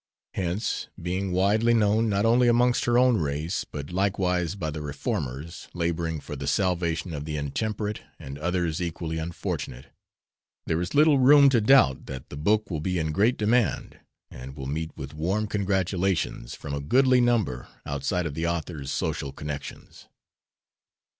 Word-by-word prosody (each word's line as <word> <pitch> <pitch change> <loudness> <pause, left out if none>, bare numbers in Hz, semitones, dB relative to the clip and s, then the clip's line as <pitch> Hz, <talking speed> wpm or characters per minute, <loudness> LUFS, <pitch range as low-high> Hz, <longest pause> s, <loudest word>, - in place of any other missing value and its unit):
Hence, 95 +4 -2
being 90 +2 -2
widely 105 +6 +3
known 110 +1 +3
not 100 +1 +1
only 120 +2 +4
amongst 120 +1 +3
her 120 0 +3
own 125 -2 +5
race 75 +2 -2
but 70 +1 -7
likewise 90 -2 0
by 80 -6 -3
the 75 0 -5
reformers, 75 +1 -4
laboring 85 -2 -1
for 75 - -7
the 70 0 -5
salvation 85 -2 0
of 75 -1 -5
the 75 -1 -3
intemperate 105 +9 -3 0.2
and 70 +2 -8
others 85 -1 -1
equally 80 -1 -3
unfortunate, 80 -6 -5 0.7
there 80 +1 0
is 90 - -4
little 150 -1 +5
room 140 +2 +7
to 120 -4 +3
doubt 105 - +4
that 65 -1 -7
the - - -8
book 105 +7 +1
will 80 -3 -2
be 90 +2 -1
in 80 -2 -1
great 110 +10 +2
demand 110 +2 0 0.3
and 65 +2 -9
will 65 - -6
meet 80 +4 -3
with 70 +1 -7
warm 95 +8 -1
congratulations 95 - -1
from 70 - -7
a 70 - -2
goodly 130 - +4
number 110 - +1 0.2
outside 70 +6 -1
of 75 - -3
the 80 +3 -2
author's 80 -4 -3
social 70 - -2
connections. 75 +1 -8
90 Hz, 160 wpm, -26 LUFS, 75-105 Hz, 0.7 s, room